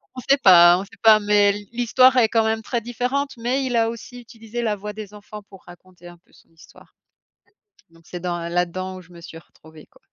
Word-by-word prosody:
on 255 - -7
sait 275 - +5
pas 175 -2 +7
on - - -5
sait 200 - -17
pas, 220 -1 +6
mais 205 -1 +2 0.2
l'histoire 245 +2 +3
est 235 -3 +4
quand 225 0 +1
même 220 0 -1
très 235 +1 -3
différente, 250 +4 -3
mais 250 +4 -2
il 250 -2 -3
a 225 -1 +1
aussi 235 +2 -10
utilisé 230 0 -9
la 215 -2 -1
voix 210 +1 -8
des 210 -1 -10
enfants 210 0 -12
pour 195 -2 -16
raconter 175 0 -17
un 175 0 -14
peu 170 - -35
son - - -24
histoire, 165 0 -20 1.0
donc 165 0 -23
c'est 180 - -8
dans 175 -1 -3
là-dedans 180 +2 -3
où - - -11
je 180 0 -21
me 170 - -14
suis 165 - -12
retrouvée, 160 -2 -19
quoi. - - -26
210 Hz, 225 wpm, -21 LUFS, 175-235 Hz, 1.0 s, pas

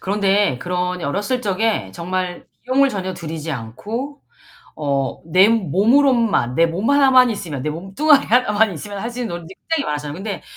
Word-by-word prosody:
그런데 200 -7 +1
그런 180 +2 -2
어렸을 205 - -1
적에 205 - -1
정말 180 - -4 0.2
비용을 275 +2 +3
전혀 190 -4 -4
들이지 160 -2 -6
않고 215 - -6 0.6
어 140 -3 -2
내 185 +5 +5
몸으로만 225 - +2
내 165 - +5
몸 185 +9 -1
하나만 265 -3 +5
있으면 165 - -5
내 150 - -2
몸뚱아리 195 - +2
하나만 220 -3 +2
있으면 200 +7 -7
할 230 +4 -4
수 245 +1 -7
있는 240 - -2
놀이들이 175 +2 -11 0.2
굉장히 320 -4 +1
많았잖아요. 145 0 -4
근데 195 +4 -5
195 Hz, 370 characters per minute, -20 LUFS, 165-235 Hz, 0.6 s, 내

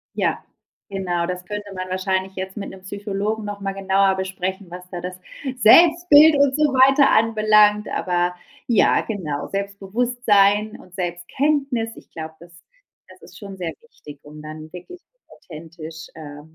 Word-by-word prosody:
Ja, - - -1 0.5
genau 180 -3 -2
das 180 0 -5
könnte 205 0 -6
man 185 0 -5
wahrscheinlich 190 0 -2
jetzt 190 +2 -6
mit 200 - -5
'nem 190 -1 -12
Psychologen 205 +2 -4
noch 205 0 -6
mal 195 0 -3
genauer 195 0 +2
besprechen, 190 0 -4
was 180 0 -9
da 175 -2 -6
das 180 +1 -7 0.4
Selbstbild 320 +4 +7
und 280 -1 +3
so 305 - +1
weiter 270 +2 +5
anbelangt. 215 -1 +4
Aber 180 -1 -1 0.3
ja, 230 -4 +3
genau 165 -10 -4
Selbstbewusstsein 205 +1 +1
und 180 - -17
Selbstkenntnis, 225 - -1
ich - - -16
glaube, 160 0 -8
das 170 +1 -17 0.5
das - - -17
ist - - -15
schon 200 -2 -9
sehr 175 -3 -4
wichtig, 150 - -15
um 150 +1 -12
dann 155 +1 -10
wirklich 355 - -10 0.3
authentisch, 165 0 -11
äh, 145 -2 -10
195 Hz, 150 wpm, -21 LUFS, 180-215 Hz, 0.5 s, Selbstbild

